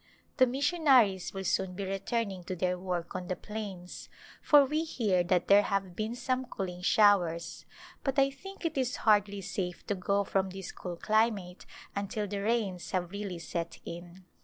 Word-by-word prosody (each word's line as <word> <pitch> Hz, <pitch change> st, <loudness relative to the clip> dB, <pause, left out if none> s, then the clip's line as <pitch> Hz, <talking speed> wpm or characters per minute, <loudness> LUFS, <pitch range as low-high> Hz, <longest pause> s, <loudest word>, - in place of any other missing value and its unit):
The 255 Hz, -2 st, +6 dB
mission 290 Hz, +6 st, -1 dB
aries 210 Hz, -9 st, +5 dB
will 195 Hz, -1 st, -5 dB
soon 190 Hz, 0 st, 0 dB
be 200 Hz, +1 st, -3 dB
returning 195 Hz, 0 st, -2 dB
to 185 Hz, -, -3 dB
their 180 Hz, +1 st, 0 dB
work 180 Hz, -2 st, -4 dB
on 180 Hz, -1 st, -5 dB
the 185 Hz, -, -1 dB
plains, 200 Hz, -5 st, -7 dB, 0.3 s
for 290 Hz, -2 st, +6 dB
we 305 Hz, +4 st, 0 dB
hear 210 Hz, -, +1 dB
that 180 Hz, 0 st, +1 dB
there 200 Hz, +1 st, +7 dB
have 195 Hz, -3 st, -2 dB
been 220 Hz, +4 st, -2 dB
some 255 Hz, +1 st, -1 dB
cooling 185 Hz, -6 st, -5 dB
showers, 180 Hz, -4 st, +3 dB, 0.4 s
but 270 Hz, 0 st, -1 dB
I 275 Hz, 0 st, +4 dB
think 390 Hz, +6 st, -10 dB
it 320 Hz, -4 st, 0 dB
is 255 Hz, -1 st, 0 dB
hardly 205 Hz, -2 st, +3 dB
safe 180 Hz, -1 st, -4 dB
to -, -, 0 dB
go 200 Hz, +1 st, 0 dB
from 190 Hz, -1 st, 0 dB
this 190 Hz, -1 st, -7 dB
cool 180 Hz, -2 st, -6 dB
climate 210 Hz, -3 st, 0 dB, 0.3 s
until 205 Hz, +2 st, -2 dB
the 200 Hz, 0 st, -3 dB
rains 205 Hz, -5 st, -1 dB
have 180 Hz, -2 st, -2 dB
really 200 Hz, -3 st, -4 dB
set 170 Hz, 0 st, -4 dB
in. 175 Hz, +2 st, -9 dB
195 Hz, 180 wpm, -30 LUFS, 180-230 Hz, 0.4 s, there